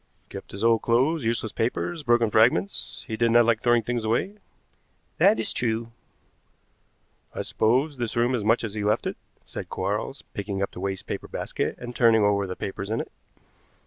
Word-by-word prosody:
"Kept - - -8
his 100 +2 -7
old 115 -1 +4
clothes, 130 +5 +2
useless 115 -1 -1
papers, 125 +10 -2
broken 120 -4 +2
fragments. 120 - +2
He 110 - -3
did 115 +1 +2
not 120 0 +6
like 115 -1 +2
throwing 120 -1 +3
things 120 +1 -2
away." 120 - -1 0.8
"That 110 - +5
is 110 - 0
true." 115 -1 -1 1.4
"I - - -2
suppose 130 +6 +1
this 120 -2 -3
room 120 +2 +2
is 120 -4 -1
much 115 +3 +2
as 110 -3 -4
he 105 -1 -3
left 105 +2 +1
it," - - -2 0.3
said - - -7
Quarles, - - -3
picking 100 -1 -4
up - - -3
the - - -9
waste 95 0 -3
paper - - -5
basket - - -3
and 120 0 -8
turning 115 -3 +5
over 100 -1 +2
the 90 - -5
papers 100 +1 -5
in 110 +1 -1
it. - - -5
115 Hz, 185 wpm, -25 LUFS, 110-120 Hz, 1.4 s, not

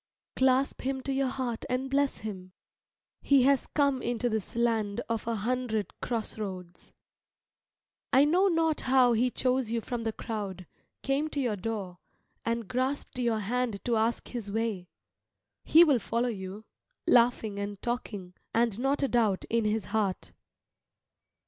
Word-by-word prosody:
Clasp 260 +1 +2
him 265 0 -2
to 275 - -2
your 270 0 +1
heart 255 -3 -3
and 255 +1 -1
bless 280 +1 +1
him. 185 -4 -7 0.7
He 275 -2 +4
has 275 0 +3
come 280 -3 +1
into 240 0 -1
this 220 -2 -3
land 225 -4 +1
of 230 -1 -3
an 230 - 0
hundred 220 -1 -1
cross 225 -2 -3
roads. 185 -4 -7 1.2
I 270 +2 +6
know 360 +6 +4
not 325 -3 +1
how 255 -2 +4
he 240 +3 +2
chose 255 -1 0
you 230 +1 0
from 240 +1 -4
the 225 -1 -1
crowd, 205 -5 -5 0.4
came 275 +3 +1
to 290 - -3
your 240 -6 0
door, 195 -3 -4 0.4
and 230 -2 -2
grasped 255 +1 -2
your 230 -3 +1
hand 230 0 -2
to 240 - +2
ask 225 +2 0
his 230 -5 -5
way. 215 -4 -2 0.8
He 330 +2 +8
will 290 -7 +4
follow 235 +3 -1
you, 200 0 -6 0.4
laughing 230 -4 +3
and 200 -1 -4
talking, 205 -6 -4 0.2
and 230 -2 +2
not 275 +3 +1
a - - +3
doubt 220 -7 +1
in 230 -1 +2
his 215 -2 0
heart. 205 -4 -1
235 Hz, 155 wpm, -29 LUFS, 215-260 Hz, 1.2 s, He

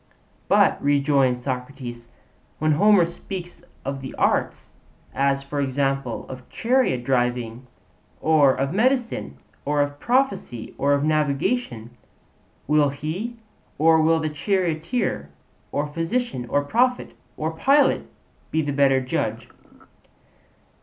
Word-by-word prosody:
But, - - +4
rejoins 140 -3 +2
Socrates, 125 -2 -6 0.5
when 155 0 +1
Homer 195 +3 +5
speaks 175 +1 -8 0.2
of 135 0 -3
the 130 - -7
arts, - - 0 0.4
as 140 0 +1
for 145 +1 -3
example, 135 -2 -1
of 130 -1 -10
chariot 235 - +1
driving, 125 -1 -1 0.5
or 155 -4 +4
of 135 +3 -1
medicine, 230 - 0 0.3
or 145 0 0
of 145 0 -1
prophecy, 235 - -1
or 140 +1 +3
of 140 0 +1
navigation 150 - 0 0.7
will 150 0 +3
he, 165 - -5 0.4
or 160 +1 +5
will 165 +1 +3
the 155 -1 -1
charioteer 170 - -1 0.4
or 145 - -1
physician 165 - -2
or 145 0 +1
prophet 250 - +1 0.2
or 155 +1 -2
pilot 275 - +2 0.4
be 160 0 0
the 145 -1 -2
better 135 -1 +3
judge? 125 - -3
145 Hz, 115 wpm, -23 LUFS, 135-170 Hz, 0.7 s, Homer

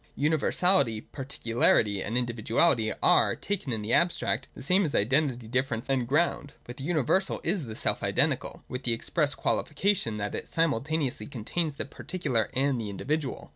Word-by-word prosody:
Universality, 155 - +2
particularity, 115 -6 0
and 115 +5 -2
individuality 120 +1 +1
are, - - +4
taken 195 -9 -3
in 110 -2 -2
the 110 - -1
abstract, 175 0 +1
the - - -9
same 185 +8 +3
as 155 - -1
identity, 125 +1 +1
difference, 125 0 -1
and 130 -3 0
ground. 145 0 0
But 120 +2 -10
the 135 - -6
universal 175 +4 +1
is 175 -3 -1
the 110 -2 -7
self - - 0
identical, - - 0
with 125 - -5
the 120 -3 +2
express 145 +5 -1
qualification, 150 - 0
that 105 0 -3
it - - -5
simultaneously 145 -5 0
contains 145 +5 -3
the - - -3
particular 140 - -2
and 135 -2 +1
the 105 - -4
individual. 140 +7 -3
135 Hz, 160 wpm, -28 LUFS, 115-155 Hz, -, are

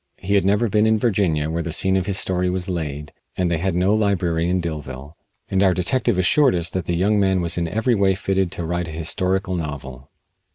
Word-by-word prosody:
He 95 +1 -3
had 100 -2 +3
never 105 +4 +2
been 105 +1 +2
in 110 0 +3
Virginia, 90 -9 +1
where 85 +1 -1
the 85 - -4
scene 95 +4 +1
of 95 -1 0
his 100 -2 -1
story 90 -1 0
was 90 0 -2
laid, 75 -5 -4 0.2
and 90 -2 0
they 80 - 0
had 95 +1 -1
no 95 +3 +2
library 90 -6 +1
in 90 +1 +1
Dillville, 75 -4 -6 0.3
and 95 - 0
our 95 -3 +4
detective 115 +4 0
assured 130 - +3
us 85 -1 -3
that 95 -2 -3
the 85 - -1
young 100 +4 +2
man 95 -2 +2
was 85 -1 -2
in 85 -1 -1
every 110 +8 0
way 100 -3 +2
fitted 95 -2 -1
to 85 - -4
write 85 +1 -2
a - - -7
historical 90 +4 -2
novel. 70 -5 -6
90 Hz, 230 wpm, -21 LUFS, 85-100 Hz, 0.3 s, our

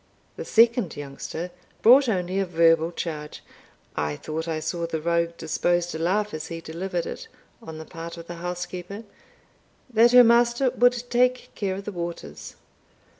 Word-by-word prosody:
The - - -6
second 230 -5 +3
youngster 145 +5 -6 0.3
brought 255 +3 +7
only 185 -2 -1
a 195 - +1
verbal 165 -1 +3
charge 155 -3 -6 0.5
(I 75 -1 -1
thought 160 - -5
I 160 -1 -2
saw 170 +2 -3
the 160 -1 -3
rogue 170 +1 0
disposed 175 +2 0
to 160 - -5
laugh 205 +5 0
as 155 +1 -5
he 165 -1 -6
delivered 170 +2 -4
it) - - -7 0.3
on 160 -1 -9
the 160 - -8
part 165 +1 -8
of 165 - -9
the 170 0 -8
housekeeper, 180 +4 -6 0.9
that 235 +1 +5
her 250 0 +9
master 240 +2 +4
would 245 -1 +3
take 250 +1 +2
care 195 -2 -2
of 195 +1 -7
the 210 - -4
waters. 170 -2 -7
175 Hz, 165 wpm, -25 LUFS, 165-215 Hz, 0.9 s, her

